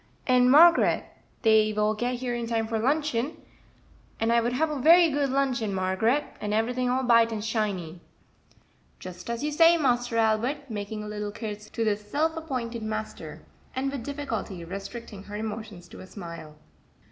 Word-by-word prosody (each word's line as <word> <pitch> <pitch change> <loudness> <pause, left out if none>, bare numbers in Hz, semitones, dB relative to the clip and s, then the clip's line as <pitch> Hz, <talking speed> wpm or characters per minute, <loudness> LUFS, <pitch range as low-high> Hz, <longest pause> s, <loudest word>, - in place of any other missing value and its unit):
"And, 250 -1 +4
Margaret, 335 +6 +6 0.4
dey 220 -1 +4
will 210 0 +1
get 245 +3 -2
here 245 0 -3
in 235 -1 -3
time 225 -1 0
for 220 0 -2
luncheon, 285 +1 0 0.8
and 225 +1 +2
I 235 - +4
would 240 +1 -1
have 305 +4 0
a 295 - -3
very 335 +2 +6
good 285 -1 0
luncheon, 255 -6 0
Margaret, 190 +9 +1 0.2
and 210 0 -1
everything 245 +3 0
all 260 +1 +1
b'ight 230 -2 +4
and 215 -1 -4
shiny." 195 -7 -2 1.0
"Just 180 +2 -9
as 235 +3 -3
you 300 - -1
say, 330 +3 +6
Master 245 -5 +1
Albert," 235 +5 0
making 210 0 -5
a - - -7
little 210 0 -4
curtsey 210 -1 -7
to 230 - -2
this 210 -1 0
self 320 +6 0
appointed 250 -8 -4
master, 215 0 -6 0.3
and 270 +1 -1
with 275 -4 -5
difficulty 230 - -5
restricting 200 +3 -8
her 205 - -8
emotions 215 -4 -6
to - - -12
a 185 - -10
smile. 170 -6 -9
230 Hz, 170 wpm, -26 LUFS, 210-265 Hz, 1.0 s, Margaret